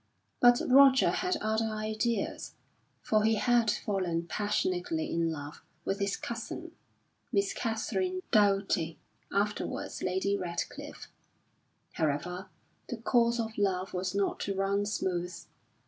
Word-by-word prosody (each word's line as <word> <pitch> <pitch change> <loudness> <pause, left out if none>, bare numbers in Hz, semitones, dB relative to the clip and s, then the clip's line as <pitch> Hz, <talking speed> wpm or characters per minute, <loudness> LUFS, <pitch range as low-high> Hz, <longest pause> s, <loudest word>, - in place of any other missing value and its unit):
But 245 0 +6
Roger 265 0 +7
had 365 0 0
other 220 +1 +1
ideas, 215 0 -2 0.5
for 215 -1 +2
he 220 +1 +4
had 235 +1 +3
fallen 185 -5 -1
passionately 180 -4 -1
in 165 -1 +1
love 145 -1 -7 0.2
with 195 +2 -1
his 200 0 0
cousin 235 +9 -6 0.6
Miss 200 -3 +1
Katharine 365 - -2
Doughty 195 -6 +2 0.3
afterwards 205 +1 -2
Lady 190 +2 0
Radcliffe. 175 -3 -5 0.8
However, 175 +5 -2 0.4
the 245 - -3
course 235 +1 +2
of 220 -2 -3
love 190 -1 0
was 185 +1 -2
not 200 -1 0
to 200 - -2
run 200 +1 +1
smooth. 180 -3 -2
205 Hz, 115 wpm, -30 LUFS, 185-225 Hz, 0.8 s, Roger